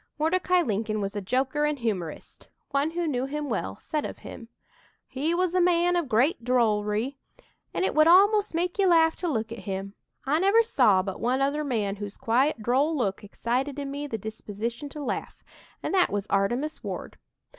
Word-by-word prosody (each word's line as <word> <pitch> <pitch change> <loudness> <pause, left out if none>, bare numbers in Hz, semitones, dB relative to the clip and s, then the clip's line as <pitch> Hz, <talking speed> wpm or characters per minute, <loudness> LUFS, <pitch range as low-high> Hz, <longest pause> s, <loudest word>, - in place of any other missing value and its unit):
Mordecai 360 +3 +2
Lincoln 215 -3 -1
was 200 0 -3
a 205 - -2
joker 260 +8 0
and 300 -1 0
humorist. 195 - -4 0.2
One 280 +2 +1
who 340 +1 -2
knew 265 -4 -1
him 295 0 -4
well 95 - -2
said 300 -2 -3
of - - -5
him: 230 - -10 0.6
"He 300 +6 -1
was 360 0 0
a 365 - +3
man 350 0 +3
of 340 -6 -1
great 240 +4 +2
drollery, 230 +1 +1 0.5
and - - 0
it - - 0
would 310 +1 +5
almost 405 +2 +5
make 355 +3 -1
you 390 - +4
laugh 325 -2 +5
to 355 - -3
look 225 -7 -2
at 230 - -6
him. 195 +1 -4 0.3
I 295 +4 +2
never 400 +5 +5
saw 245 - +3
but 195 -1 -5
one 250 +3 +1
other 280 +2 0
man 215 -8 -1
whose 205 0 -7
quiet, 240 +1 +1
droll 275 +7 +2
look 200 -5 -1
excited 250 +7 -2
in 280 -1 -4
me 290 +1 -4
the 225 - -3
disposition 220 +5 -5
to 295 +1 -7
laugh, - - -4 0.4
and - - -2
that 370 -2 +4
was 200 -1 -2
'Artemus 240 +10 0
Ward.' - - -6
270 Hz, 190 wpm, -26 LUFS, 220-320 Hz, 0.6 s, would